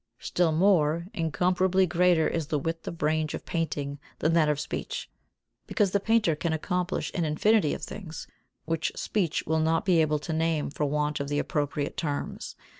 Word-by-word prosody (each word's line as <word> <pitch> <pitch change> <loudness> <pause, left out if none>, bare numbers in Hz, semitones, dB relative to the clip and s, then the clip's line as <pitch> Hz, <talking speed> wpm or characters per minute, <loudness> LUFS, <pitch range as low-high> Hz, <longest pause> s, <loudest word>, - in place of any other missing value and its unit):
Still 175 -2 +1
more, 165 -2 +3
incomparably 180 +4 +2
greater 175 -1 +3
is 165 -3 -2
the 150 - 0
width 165 +3 -4
of 165 -3 -5
range 155 0 +1
of - - -8
painting 145 -4 -2 0.2
than 160 +2 +1
that 160 -2 +4
of 150 -1 +1
speech, - - -5 0.6
because 205 -6 +1
the 200 - +2
painter 215 -5 +2
can 160 +2 -1
accomplish 180 +3 -2
an 175 - 0
infinity 160 +3 +2
of - - -9
things 170 -6 -7 0.4
which 160 0 -1
speech 185 -8 -1
will 160 +1 +1
not 160 +1 +1
be 175 -4 +4
able 155 -1 +2
to 150 +2 -4
name 160 -2 0
for 150 - -1
want 150 +1 0
of 140 - -3
the 145 - 0
appropriate 145 -1 -2
terms. 145 -3 -3
160 Hz, 180 wpm, -27 LUFS, 150-180 Hz, 0.6 s, that